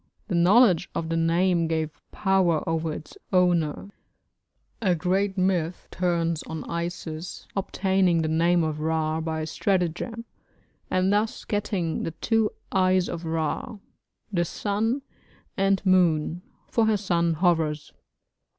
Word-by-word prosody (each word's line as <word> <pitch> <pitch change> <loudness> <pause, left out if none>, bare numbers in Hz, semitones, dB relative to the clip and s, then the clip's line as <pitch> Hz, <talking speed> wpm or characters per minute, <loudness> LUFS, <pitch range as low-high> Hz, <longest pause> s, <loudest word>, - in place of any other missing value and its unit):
The - - -2
knowledge 185 +2 +5
of 160 - -2
the 165 - 0
name 170 +1 +2
gave 160 -1 -1 0.2
power 190 -5 +1
over 165 -1 -1
its 150 0 -8 0.2
owner; 180 0 +1 0.9
a 185 -5 +2
great 190 +4 0
myth 180 -2 0
turns 170 -3 0
on 160 -1 -5
Isis 170 -1 -5
obtaining 190 -3 +1
the - - 0
name 170 +2 +3
of 155 -1 -2
Ra 160 0 0
by 160 -1 -2
stratagem, 190 +7 -1 0.6
and 185 +2 +2
thus 215 +2 -1
getting 200 -5 -1
the 165 - -4
two 225 -2 +2 0.2
eyes 185 -1 +3
of 170 0 -5
Ra 160 +6 -2 0.6
the 175 -2 +2
sun 220 - -1 0.5
and 195 0 +1
moon 175 -3 +3 0.3
for 230 -2 +2
her 215 -1 +3
son 170 -4 +1
Horus. 160 -3 +1
175 Hz, 125 wpm, -25 LUFS, 160-190 Hz, 0.9 s, knowledge